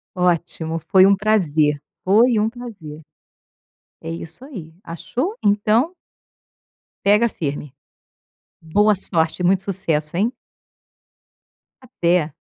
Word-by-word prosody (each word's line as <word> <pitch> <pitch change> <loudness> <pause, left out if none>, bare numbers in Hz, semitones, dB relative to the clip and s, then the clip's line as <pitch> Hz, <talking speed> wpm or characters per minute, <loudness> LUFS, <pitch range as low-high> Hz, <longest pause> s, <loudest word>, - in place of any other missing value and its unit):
Ótimo. 170 -2 -1
Foi 185 +4 +4
um 200 - +4
prazer. 160 -8 +1 0.2
Foi 225 +5 +4
um 215 +1 +2
prazer. 205 -11 -10 1.0
É 165 - -7
isso 165 +6 -7
aí. 185 - -10
Achou? 185 - -4
Então 215 - +2 1.1
pega 210 +4 +4
firme. 145 - -5 0.9
Boa 205 +7 +2
sorte, 170 -2 -1
muito 190 +1 +2
sucesso, 170 -5 -1
hein. 215 +7 +1 1.5
Até. 175 - 0
185 Hz, 95 wpm, -20 LUFS, 160-215 Hz, 1.5 s, Foi